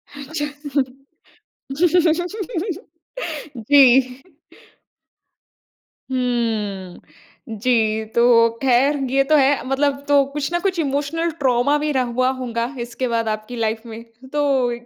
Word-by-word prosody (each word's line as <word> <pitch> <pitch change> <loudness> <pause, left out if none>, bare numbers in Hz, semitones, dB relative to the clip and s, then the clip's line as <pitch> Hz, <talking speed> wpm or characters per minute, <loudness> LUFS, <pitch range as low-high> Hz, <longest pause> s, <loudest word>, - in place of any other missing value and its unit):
अच्छा। 290 -1 -3 2.9
जी। 285 - +8 2.3
हम्म, 225 -3 -4
जी 220 -2 +1
तो 235 -1 +5
खैर 270 +2 +3 0.2
ये 275 0 +3
तो 305 +3 +2
है, 280 -1 +3
मतलब 280 +1 0
तो 285 -1 +5
कुछ 295 +2 -3
ना 345 - 0
कुछ 375 -2 -1
इमोशनल 295 +3 -1
ट्रोमा 260 +1 +2
भी 300 0 -1
रह 265 -3 +1 0.2
हुआ 255 0 +3
होंगा 235 -2 -2
इसके 240 +2 -3
बाद 230 -1 -1
आपकी 215 +3 -5
लाइफ़ 225 0 -2
में? 225 0 -8 0.3
तो 275 -4 +1
260 Hz, 105 wpm, -20 LUFS, 235-285 Hz, 2.9 s, जी